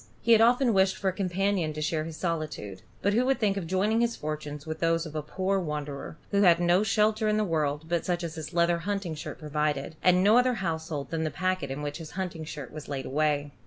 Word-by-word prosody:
He 235 Hz, -, +1 dB
had 225 Hz, -1 st, +7 dB
often 240 Hz, +1 st, +4 dB
wished 190 Hz, -1 st, +3 dB
for 195 Hz, -, 0 dB
a -, -, -3 dB
companion 185 Hz, -3 st, 0 dB
to 155 Hz, -, -6 dB
share 155 Hz, 0 st, -1 dB
his 160 Hz, -1 st, -7 dB
solitude; 155 Hz, -, -3 dB, 0.2 s
but 200 Hz, -, +2 dB
who 235 Hz, +4 st, +3 dB
would 270 Hz, -, +3 dB
think 205 Hz, -4 st, +2 dB
of 190 Hz, -4 st, -4 dB
joining 205 Hz, +6 st, +1 dB
his 235 Hz, 0 st, +1 dB
fortunes 150 Hz, -1 st, -5 dB
with 160 Hz, 0 st, -5 dB
those 165 Hz, 0 st, +1 dB
of 155 Hz, -, -8 dB
a 155 Hz, -, -1 dB
poor 190 Hz, +6 st, -1 dB
wanderer, 150 Hz, -3 st, -5 dB
who 200 Hz, -1 st, +3 dB
had 175 Hz, -4 st, +6 dB
no 175 Hz, +2 st, +4 dB
shelter 215 Hz, +1 st, +2 dB
in 215 Hz, 0 st, +2 dB
the 215 Hz, -, +2 dB
world 155 Hz, -4 st, -1 dB
but 170 Hz, -1 st, 0 dB
such 175 Hz, -1 st, -1 dB
as 165 Hz, -2 st, -4 dB
his 160 Hz, -1 st, -6 dB
leather 170 Hz, 0 st, +2 dB
hunting 195 Hz, -1 st, -2 dB
shirt 150 Hz, -, -7 dB
provided, 150 Hz, -1 st, -2 dB
and 180 Hz, 0 st, +4 dB
no 215 Hz, +4 st, +6 dB
other 250 Hz, 0 st, +2 dB
household 160 Hz, -6 st, -3 dB
than 165 Hz, -1 st, -1 dB
the 155 Hz, -, 0 dB
packet 185 Hz, -1 st, -1 dB
in 135 Hz, +2 st, -4 dB
which 145 Hz, 0 st, -3 dB
his 160 Hz, -2 st, -8 dB
hunting 175 Hz, -4 st, -4 dB
shirt 150 Hz, -4 st, -7 dB
was 155 Hz, -1 st, -8 dB
laid 135 Hz, -2 st, -3 dB
away? 145 Hz, 0 st, 0 dB
170 Hz, 240 wpm, -28 LUFS, 155-195 Hz, 0.2 s, had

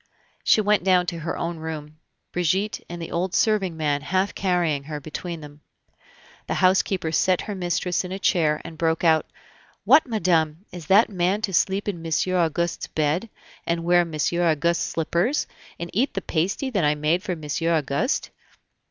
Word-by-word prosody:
She 215 Hz, -, +4 dB
went 210 Hz, -2 st, +2 dB
down 180 Hz, -1 st, +4 dB
to 170 Hz, -1 st, -4 dB
her 165 Hz, +1 st, -4 dB
own 170 Hz, 0 st, -3 dB
room, 155 Hz, -1 st, -7 dB, 0.3 s
Brigitte 185 Hz, +5 st, 0 dB
and 175 Hz, 0 st, -6 dB
the 165 Hz, -, -6 dB
old 180 Hz, +2 st, -1 dB
serving 195 Hz, -6 st, +1 dB
man 145 Hz, -2 st, 0 dB
half 185 Hz, +6 st, 0 dB
carrying 175 Hz, -7 st, 0 dB
her 150 Hz, 0 st, -5 dB
between 165 Hz, +3 st, -6 dB
them. 145 Hz, 0 st, -12 dB, 0.9 s
The -, -, -1 dB
housekeeper 185 Hz, -2 st, +2 dB
set 180 Hz, +3 st, +2 dB
her 210 Hz, -, -5 dB
mistress 180 Hz, -1 st, -1 dB
in 180 Hz, -, -7 dB
a 190 Hz, -, -3 dB
chair, 160 Hz, -6 st, +2 dB
and 165 Hz, -1 st, -9 dB
broke 160 Hz, 0 st, +1 dB
out: 160 Hz, -2 st, +3 dB, 0.6 s
"What, 310 Hz, -, +6 dB
madame! 170 Hz, -6 st, +1 dB
is 170 Hz, -4 st, -9 dB
that 205 Hz, +4 st, +5 dB
man 190 Hz, +3 st, 0 dB
to 195 Hz, -, -1 dB
sleep 195 Hz, +4 st, +1 dB
in 180 Hz, -5 st, -3 dB
Monsieur 165 Hz, +3 st, 0 dB
Auguste's 170 Hz, 0 st, 0 dB
bed, 160 Hz, +8 st, -1 dB, 0.4 s
and 170 Hz, 0 st, 0 dB
wear 175 Hz, +1 st, +4 dB
Monsieur 170 Hz, +1 st, -1 dB
Auguste's 170 Hz, +2 st, +1 dB
slippers, 170 Hz, -, 0 dB, 0.3 s
and 170 Hz, 0 st, -5 dB
eat 255 Hz, +7 st, 0 dB
the 195 Hz, -, -1 dB
pasty 190 Hz, -, -1 dB
that 200 Hz, -7 st, 0 dB
I 150 Hz, 0 st, +3 dB
made 155 Hz, +4 st, +1 dB
for 185 Hz, -3 st, -3 dB
Monsieur 160 Hz, +2 st, -2 dB
Auguste? 145 Hz, -, -1 dB
170 Hz, 175 wpm, -24 LUFS, 160-190 Hz, 0.9 s, What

